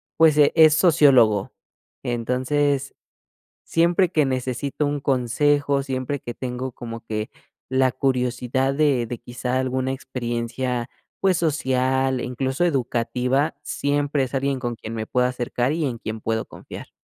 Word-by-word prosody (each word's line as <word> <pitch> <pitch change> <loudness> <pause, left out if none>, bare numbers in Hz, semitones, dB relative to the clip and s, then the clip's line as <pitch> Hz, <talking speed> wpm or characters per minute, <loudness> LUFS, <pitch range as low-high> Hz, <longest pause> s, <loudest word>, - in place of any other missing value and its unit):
pues 160 -2 +5
e 145 -1 +5
es 155 -2 +7
sociólogo. 135 - +4 0.5
Entonces, 130 +4 0 0.7
siempre 170 +2 +2
que 155 -2 +3
necesito 130 +2 -2
un 145 0 -2
consejo, 140 +2 +1
siempre 135 +1 -3
que 120 - -6
tengo 125 +1 -4
como 115 -1 -8
que 110 -1 -3 0.4
la 130 0 +2
curiosidad 125 0 0
de 140 -4 +2
de 120 +1 -5
quizá 125 +2 -3
alguna 130 0 -1
experiencia, 125 -1 -3 0.3
pues 190 -1 +3
social, 130 -4 +1
e - - -4
incluso 130 +5 -1
educativa, 125 -1 0
siempre 145 -1 0
es 130 - -5
alguien 135 0 0
con 120 -2 -3
quien 110 - -7
me 110 -1 -3
puedo 125 +2 +1
acercar 125 +1 -1
y 165 0 -1
en 125 -4 -2
quien 110 -1 -6
puedo 110 0 -1
confiar. - - -10
130 Hz, 140 wpm, -23 LUFS, 125-145 Hz, 0.7 s, es